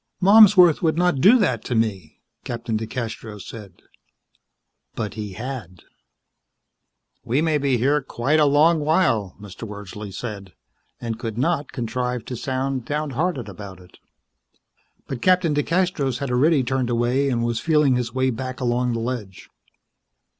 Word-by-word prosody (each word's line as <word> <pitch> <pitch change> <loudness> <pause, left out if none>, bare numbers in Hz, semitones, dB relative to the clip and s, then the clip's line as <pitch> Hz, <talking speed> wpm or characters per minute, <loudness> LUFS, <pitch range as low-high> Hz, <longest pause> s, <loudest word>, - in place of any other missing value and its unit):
"Malmsworth 195 -4 +7
would 160 -2 +1
not 175 -6 +1
do 225 - +7
that 130 - 0
to 125 - -2
me," 100 -8 -2 0.2
Captain 115 -1 -4
DeCastros 110 -2 -5
said. 100 -6 -11 1.1
But 110 -2 -4
he 105 -3 -6
had. 110 -6 -7 1.4
"We 125 +5 0
may 155 -1 +1
be 135 -3 +1
here 140 +5 +2
quite 135 +4 0
a 150 - +5
long 155 +4 +4
while," 145 - +1
Mr. 105 +2 -9
Wordsley 105 0 -8
said, 100 -3 -7 0.5
and 115 -1 -5
could 115 -2 -5
not 145 +2 0
contrive 125 -1 -3
to 125 - -5
sound 130 +1 -2
downhearted 150 - -2
about 95 -1 -9
it. 90 0 -18 1.1
But 130 - -5
Captain 180 -4 +3
DeCastros 150 -4 0
had 140 -1 -4
already 140 +3 +3
turned 130 0 -1
away 120 +4 +1
and 120 -2 0
was 120 -1 -1
feeling 150 -2 +3
his 120 -1 -2
way 130 +1 0
back 130 +1 -5
along 125 0 0
the 115 - -2
ledge. 115 -5 -6
125 Hz, 145 wpm, -22 LUFS, 115-150 Hz, 1.4 s, Malmsworth